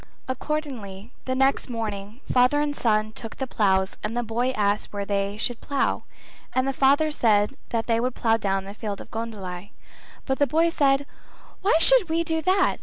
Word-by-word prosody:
Accordingly 255 -7 -4
the 260 - -1
next 270 0 +2
morning 215 0 -5
father 250 +3 +4
and 295 -1 -1
son 215 -3 +1
took 225 0 -7
out - - -29
the 265 - -2
ploughs 190 -5 +1
and 225 +3 -3
the 240 - 0
boy 235 +3 0
asked 210 -4 0
where 200 -1 -3
they 200 0 -1
should 235 +2 -2
plough, 280 -1 -1 0.5
and 260 +1 +2
the 270 - 0
father 285 +4 +3
said 215 -3 +2
that 230 -1 -1
they 230 -1 +1
would 250 +1 -1
plough 225 -1 +2
down 195 -3 -1
the 200 - -8
field 205 -1 -5
of - - -11
goondli. 205 -5 -6 0.6
But 265 -1 -1
the 285 - +4
boy 325 +5 +3
said 280 -3 +2 0.6
"Why 385 -4 +4
should 435 +1 +5
we 330 +1 +1
do 320 -1 -1
that? 370 +2 +2
240 Hz, 190 wpm, -25 LUFS, 210-280 Hz, 0.6 s, should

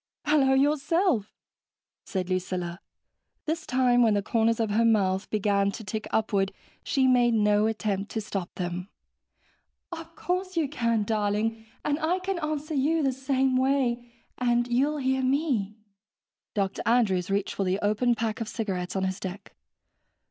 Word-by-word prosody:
"Hello 275 -3 +4
yourself," 295 - +2 0.7
said 185 -2 -3
Lucilla. 180 -1 -2 0.7
This 315 +1 -3
time 250 -1 +3
when 225 -3 +4
the 200 - 0
corners 230 +1 +1
of 220 -2 0
her 225 +3 +3
mouth 195 -4 +2
began 200 -1 +1
to 225 - -7
tick 215 +2 -4
upward, 200 -3 +1 0.3
she 270 -2 +1
made 245 -2 +4
no 210 0 +3
attempt 210 -2 -2
to 225 - -1
stop 195 -4 -4
them. 180 +1 -4 1.0
(Of 330 -1 -8
course 365 0 -2
you 315 -3 +2
can, 230 -6 0
darling. 215 +1 -1 0.2
And 295 +1 0
I 330 +3 +1
can 375 -1 -3
answer 305 0 -3
you 305 +3 +2
the 270 - +2
same 265 0 +1
way, 255 -3 +1 0.3
and 240 -1 +2
you'll 275 +5 +1
hear 265 -1 0
me.) 255 -7 0 0.8
Dr. 195 -1 -1
Andrews 205 -7 +2
reached 200 0 0
for 200 - -1
the 185 0 +1
open 220 +4 +2
pack 225 0 -2
of 225 - -2
cigarettes 190 -7 -3
on 190 - 0
his 190 0 -2
deck. 190 +1 -7
230 Hz, 155 wpm, -27 LUFS, 205-270 Hz, 1.0 s, Hello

